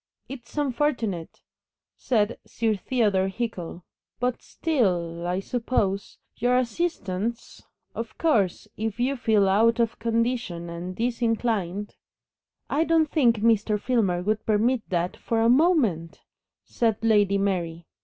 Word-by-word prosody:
"It's 255 0 -10
unfortunate," 245 - -1 0.5
said 225 -2 0
Sir 225 -2 -1
Theodore 205 -3 +1
Hickle; 190 -5 -5 0.4
"but 245 0 -1
still 175 - -1
I 180 +1 0
suppose 200 -3 -1 0.2
Your 245 +2 +2
assistants 235 - -2 0.3
Of 230 -1 -6
course, 220 - +1
if 220 +1 -3
you 260 +3 +1
feel 220 -5 +2
out 225 +4 +3
of 230 -1 0
condition 230 -7 -1
and 175 +2 -6
disinclined 225 -4 -1 0.4
" - - -68 0.3
"I 310 - +1
don't 325 -2 +2
think 235 -8 +3
Mr. 215 -2 +2
Filmer 200 -8 +1
would 215 +2 0
permit 225 +3 +2
THAT 175 -1 -1
for 230 - -1
a 225 +1 +4
moment," 245 - +2 0.4
said 225 -2 0
Lady 205 -3 +4
Mary. 175 -4 -2
225 Hz, 125 wpm, -25 LUFS, 190-245 Hz, 0.5 s, a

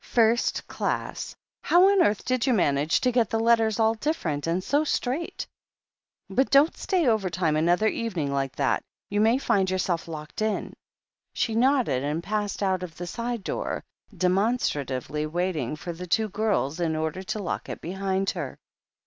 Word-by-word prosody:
"First 230 0 +2
class. - - -3 0.3
How 360 +2 +5
on 395 -2 +4
earth 210 - +2
did 255 0 0
you 255 - +4
manage 145 -4 +2
to 250 - +2
get 240 -3 +2
the 225 - 0
letters 225 -1 +3
all 220 0 +4
different 200 - -2
and 175 +3 0
so 290 +7 +2
straight! 290 +1 -2 0.8
But 265 +1 +1
don't 285 +4 +5
stay 365 -5 0
overtime 185 - +1
another 175 +7 +3
evening 180 -13 -2
like 135 -2 -1
that. 140 -2 +1 0.3
You 205 +1 +2
may 225 +3 +4
find 195 -8 +1
yourself 185 -3 -1
locked 155 +3 -7
in." 215 -1 -1 0.6
She 225 - -1
nodded 250 - +2
and 150 +4 -2
passed 210 0 -2
out 190 -2 +1
of 175 -3 -7
the 175 - -5
side 235 +3 -4
door, - - -3 0.3
demon 195 +7 +2
stratively 145 - -2
waiting 165 -6 -1
for 170 +3 -6
the 180 +2 -8
two 215 +5 +1
girls, 200 -8 0
in 165 -2 0
order 160 +3 -2
to 190 +3 -4
lock 180 - -4
it - - -5
behind 190 +2 -1
her. - - -5
195 Hz, 170 wpm, -26 LUFS, 165-230 Hz, 0.8 s, How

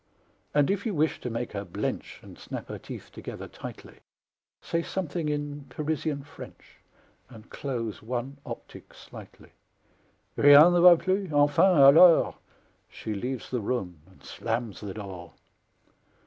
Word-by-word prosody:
And 145 +3 +3
if 200 0 -2
you 210 - -2
wish 155 +1 0
to 125 - -4
make 115 +1 -4
her 100 -1 -5
blench 85 -4 -5
And - - -13
snap - - -8
her - - -6
teeth - - -10
together - - -8
tightly, - - -11 0.6
Say 165 - -2
something 170 -3 -3
in 145 -1 -4
Parisian 150 +1 -3
French, 145 - -14 0.5
And 115 -3 -15
close 115 -6 -5
one 125 +4 -5
optic - - -10
slightly. - - -14 0.8
"Rien 145 +4 +8
ne 175 - +3
va 175 0 +8
plus! 185 +1 -1
Enfin, 145 +5 +4
alors!" 155 +5 +7 0.6
She 110 - -6
leaves 125 +4 -5
the 125 -2 -1
room 95 -7 -3
and 95 - -22
slams 115 -3 -4
the 100 -3 -7
door! 95 -4 -9
140 Hz, 140 wpm, -27 LUFS, 115-160 Hz, 0.8 s, Rien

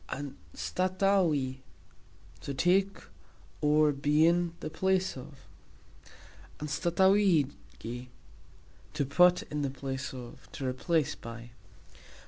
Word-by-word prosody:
"Anstatauxi", 150 - -1 0.8
to 140 - -5
take 190 +6 +2 0.6
(or, 150 0 +4
be 145 +2 +3
in) 170 0 +2
the - - -6
place 190 +3 +1
of; 135 +1 -12 1.1
"anstatauxigi", 160 - +1 0.9
to 140 - 0
put 180 +6 +4
in 150 0 -4
the 140 - 0
place 135 -1 -5
of, 125 -2 -11
to 135 - -5
replace 150 +3 0
(by). 115 +1 -10
150 Hz, 95 wpm, -30 LUFS, 135-180 Hz, 1.1 s, or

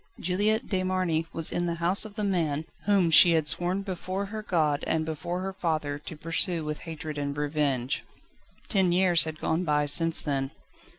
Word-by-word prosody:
Juliette 205 +5 0
de 190 -3 -1
Marny 185 -3 0
was 165 -1 -1
in 175 0 -1
the 170 - -1
house 175 +5 +1
of 210 -2 -10
the 215 - -3
man, 160 -6 0 0.2
whom 195 -5 +3
she 170 +2 +8
had 160 -2 +1
sworn 175 +5 +1
before 190 +1 -4
her 215 +2 -6
God 155 -7 0
and 160 -1 0
before 170 +3 -4
her 195 0 -4
father 155 -5 -2
to 150 +1 -9
pursue 165 +1 +1
with 150 0 -4
hatred 155 -2 -6
and 140 0 -3
revenge. 145 -3 -1 0.6
Ten 190 -5 +2
years 175 -2 +4
had 160 -1 -5
gone 160 +3 0
by 150 -3 +1
since 165 +3 +3
then. 135 -2 -2
165 Hz, 185 wpm, -27 LUFS, 150-185 Hz, 0.6 s, she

